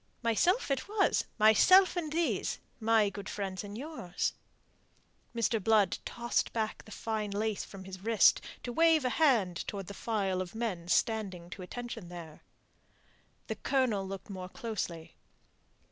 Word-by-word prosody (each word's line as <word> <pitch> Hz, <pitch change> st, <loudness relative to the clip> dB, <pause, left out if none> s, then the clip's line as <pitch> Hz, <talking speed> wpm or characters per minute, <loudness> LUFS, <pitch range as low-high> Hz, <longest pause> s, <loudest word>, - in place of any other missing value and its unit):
"Myself 295 Hz, -, +2 dB
it 275 Hz, +7 st, -1 dB
was 420 Hz, -1 st, +2 dB
myself 365 Hz, -, +6 dB
and 325 Hz, -4 st, -2 dB
these, 335 Hz, +1 st, 0 dB, 0.2 s
my 220 Hz, -2 st, +3 dB
good 200 Hz, -1 st, -7 dB
friends 195 Hz, -2 st, -4 dB
and 205 Hz, +1 st, -7 dB
yours." 255 Hz, -, -3 dB, 1.0 s
Mr. 230 Hz, -2 st, +1 dB
Blood 215 Hz, -4 st, +3 dB
tossed 235 Hz, 0 st, -1 dB
back 220 Hz, -2 st, -2 dB
the 215 Hz, -, -14 dB
fine 215 Hz, 0 st, -3 dB
lace 210 Hz, +1 st, -1 dB
from 195 Hz, -1 st, -10 dB
his 190 Hz, 0 st, -8 dB
wrist, 225 Hz, -2 st, +5 dB, 0.2 s
to 245 Hz, -, -4 dB
wave 325 Hz, -1 st, +4 dB
a -, -, +3 dB
hand 230 Hz, -, +3 dB
towards 195 Hz, -2 st, -5 dB
the -, -, -6 dB
file 195 Hz, -4 st, -1 dB
of 185 Hz, +2 st, -7 dB
men 205 Hz, -7 st, -3 dB
standing 185 Hz, -3 st, 0 dB
to 190 Hz, -, -7 dB
attention 230 Hz, +1 st, -6 dB
there. 165 Hz, -3 st, -9 dB, 1.0 s
The -, -, -4 dB
Colonel 235 Hz, -8 st, +1 dB
looked 195 Hz, +1 st, -7 dB
more 185 Hz, -1 st, -6 dB
closely. 185 Hz, -9 st, -5 dB
215 Hz, 145 wpm, -31 LUFS, 190-240 Hz, 1.0 s, myself